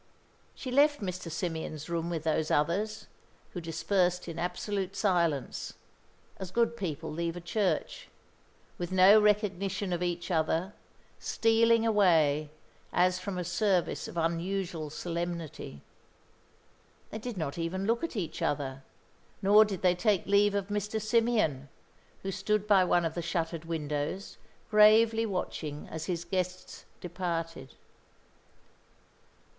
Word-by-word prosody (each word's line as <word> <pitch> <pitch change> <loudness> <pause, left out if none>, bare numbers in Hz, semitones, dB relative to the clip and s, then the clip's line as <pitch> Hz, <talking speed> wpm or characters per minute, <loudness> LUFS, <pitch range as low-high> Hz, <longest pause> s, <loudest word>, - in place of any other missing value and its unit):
She 255 - -6
left 290 +3 +4
Mr. 180 -3 -4
Symeon's 160 -2 -4
room 170 0 -2
with 165 -3 -3
those 160 -1 0
others, 200 +9 0 0.5
who 175 - -5
dispersed 180 +2 0
in 165 -1 -6
absolute 190 +2 -3
silence, 170 - 0 0.6
as 190 -2 -6
good 235 +4 +1
people 160 -7 -4
leave 170 +2 -2
a - - -5
church, 205 - -1 0.7
with 175 0 -4
no 190 +3 +7
recognition 200 -2 +1
of 175 - -2
each 175 0 -2
other, 165 +4 0 0.5
stealing 230 0 +3
away 160 -9 +3 0.4
as 180 +1 +2
from 185 0 -5
a 180 - -2
service 180 +1 0
of - - -9
unusual 170 -1 -2
solemnity. 170 - -5 1.3
They 220 - -5
did 235 -1 -6
not 155 -1 -3
even 185 +4 -2
look 230 +6 +1
at 335 - -3
each 185 -7 -4
other, 135 -2 -2 0.6
nor 210 +2 +6
did 195 -4 -5
they 180 -1 +5
take 190 0 +1
leave 200 0 +3
of 200 0 -2
Mr. 210 +1 -2
Symeon, 215 - +1 0.6
who 195 - -2
stood 205 +2 0
by 200 -3 +5
one 175 -1 +2
of 160 - -2
the 175 - -3
shuttered 165 -1 -2
windows, 150 +3 -3 0.3
gravely 220 +1 +6
watching 155 -6 -4
as 160 -1 -5
his 175 -2 -3
guests 185 0 -4
departed. 165 -6 -4
180 Hz, 130 wpm, -30 LUFS, 165-205 Hz, 1.3 s, no